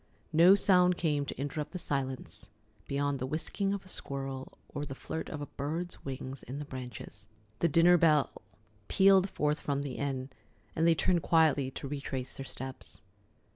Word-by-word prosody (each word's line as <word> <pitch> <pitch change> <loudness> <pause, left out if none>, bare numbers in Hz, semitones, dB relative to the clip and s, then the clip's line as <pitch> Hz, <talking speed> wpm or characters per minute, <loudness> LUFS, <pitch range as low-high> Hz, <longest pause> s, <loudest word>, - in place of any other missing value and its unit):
No 170 +5 +8
sound 180 -3 +4
came 145 -4 0
to - - -5
interrupt 145 +2 -3
the - - -3
silence 135 -6 -4 0.4
beyond 140 0 0
the 130 - -2
whisking 180 +7 -1
of 200 -1 -3
a - - -14
squirrel 135 -5 -5 0.2
or 145 - -3
the 135 -2 -6
flirt 160 +4 -5
of 150 - -5
a - - -3
bird's 160 +6 -4
wings 135 -1 -6
in 130 +3 -7
the 150 - -5
branches. 125 -6 -8 0.3
The 170 - +3
dinner 170 +3 +6
bell 150 -5 +4 0.6
pealed 195 0 +5
forth 150 -2 0
from 140 -1 -1
the 140 -3 -5
inn, 135 -1 -3 0.4
and 165 +1 +3
they 165 - +5
turned 175 +1 +2
quietly 155 -6 +3
to 135 - -7
retrace 135 -2 -4
their 135 - -6
steps. 95 - -8
145 Hz, 175 wpm, -31 LUFS, 135-165 Hz, 0.6 s, No